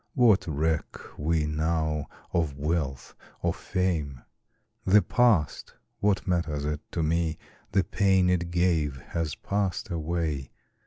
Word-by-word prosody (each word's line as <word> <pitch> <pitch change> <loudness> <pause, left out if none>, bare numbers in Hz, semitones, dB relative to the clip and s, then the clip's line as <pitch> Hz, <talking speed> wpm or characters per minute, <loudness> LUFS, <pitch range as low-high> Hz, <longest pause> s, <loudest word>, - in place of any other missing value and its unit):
What 115 -9 +5
reck 80 +1 -1 0.2
we 80 +1 +1
now 80 0 0 0.3
of 80 -5 0
wealth 75 -3 -2 0.3
or - - +2
fame? 80 -9 -2 0.6
The 105 +2 +5
past 110 - +2 0.2
what 100 -2 +1
matters 80 -5 0
it 75 0 -2
to 85 - 0
me? 80 0 +1 0.3
The 95 -1 +3
pain 95 0 +3
it 90 -1 +1
gave 85 -6 +1 0.2
has 80 -4 -1
passed 100 -3 -2
away. 80 -5 -2
80 Hz, 120 wpm, -27 LUFS, 75-90 Hz, 0.6 s, What